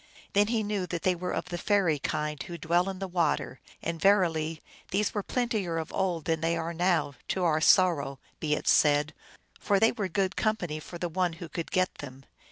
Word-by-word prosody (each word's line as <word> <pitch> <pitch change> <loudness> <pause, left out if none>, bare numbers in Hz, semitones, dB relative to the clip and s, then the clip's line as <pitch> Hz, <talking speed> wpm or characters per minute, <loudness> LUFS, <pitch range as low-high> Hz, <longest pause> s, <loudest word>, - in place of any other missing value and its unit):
Then 205 +1 +4
he 225 -1 0
knew 205 -3 -2
that 170 -1 -4
they 185 - +3
were 180 +1 -4
of - - -3
the 175 -1 -4
fairy 180 -7 +2
kind, 150 +1 -2
who 175 - -6
dwell 175 +3 +1
in 190 - -5
the 195 +1 -4
water; 170 -7 0 0.2
and, 165 -1 -3
verily, 165 -6 +2 0.3
these 205 +3 0
were 205 - -1
plentier 215 -7 -1
of 160 - -4
old 175 -5 -1
than 160 -1 0
they 165 +1 +1
are 165 +1 -3
now, 170 -4 +1
to 185 - -1
our 160 -2 +2
sorrow 155 -7 +4 0.2
be 150 -1 +1
it - - -6
said, 150 +1 +4 0.5
for 200 -1 +2
they 225 - +5
were 210 -5 -2
good 190 +1 -1
com 215 0 +1
pany 155 -5 -5
for 175 - -9
the 175 - -2
one 175 +1 0
who 170 +1 -8
could 165 +1 -5
get 185 0 +1
them. 135 -1 -9
175 Hz, 215 wpm, -28 LUFS, 160-190 Hz, 0.5 s, they